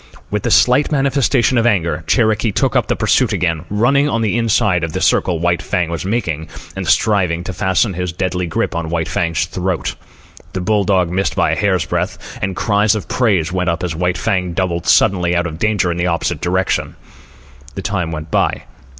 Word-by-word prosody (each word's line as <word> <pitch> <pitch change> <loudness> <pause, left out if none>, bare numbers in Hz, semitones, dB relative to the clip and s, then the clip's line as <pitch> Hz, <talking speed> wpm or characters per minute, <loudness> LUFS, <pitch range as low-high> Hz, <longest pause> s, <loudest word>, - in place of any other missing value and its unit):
With - - -1
a - - +1
slight 130 +5 +4
manifestation 135 -3 +2
of 115 - +2
anger, 85 -7 0
Cherokee 110 -2 +2
took - - 0
up - - +2
the - - 0
pursuit - - +2
again, 85 -1 -1
running 135 +8 +2
on 115 -4 0
the 110 0 0
inside 105 -6 +2
of 80 -1 -3
the - - -2
circle 90 -2 +2
White 85 +1 0
Fang 85 -2 -1
was 85 +1 -4
making, 85 -8 -2 0.3
and - - -4
striving 90 -6 +2
to 95 - -5
fasten 95 +3 +1
his 90 0 -3
deadly 90 0 -2
grip 80 - -2
on 85 -1 -3
White 80 -1 -1
Fang's 85 -3 -1
throat. 90 -1 -3 0.6
The 95 - -2
bull 105 +1 +1
dog 90 -3 +1
missed 95 -3 -1
by - - +2
a - - +1
hair's 95 -5 +1
breadth, - - -4
and 95 0 -2
cries 105 -1 +2
of 105 - -5
praise 95 -10 +1
went 90 -1 0
up 85 +2 -2
as 90 -3 -2
White 90 +2 -1
Fang 90 -2 -1
doubled 85 -2 -2
suddenly 90 -2 +3
out 85 0 +1
of 80 -2 -6
danger 105 -4 +1
in 85 - -3
the 90 +1 0
opposite 85 -2 -1
direction. 95 +2 -1 0.8
The 95 - -5
time 90 -5 -2
went 80 -1 -6
by. - - 0
90 Hz, 200 wpm, -17 LUFS, 85-105 Hz, 0.8 s, slight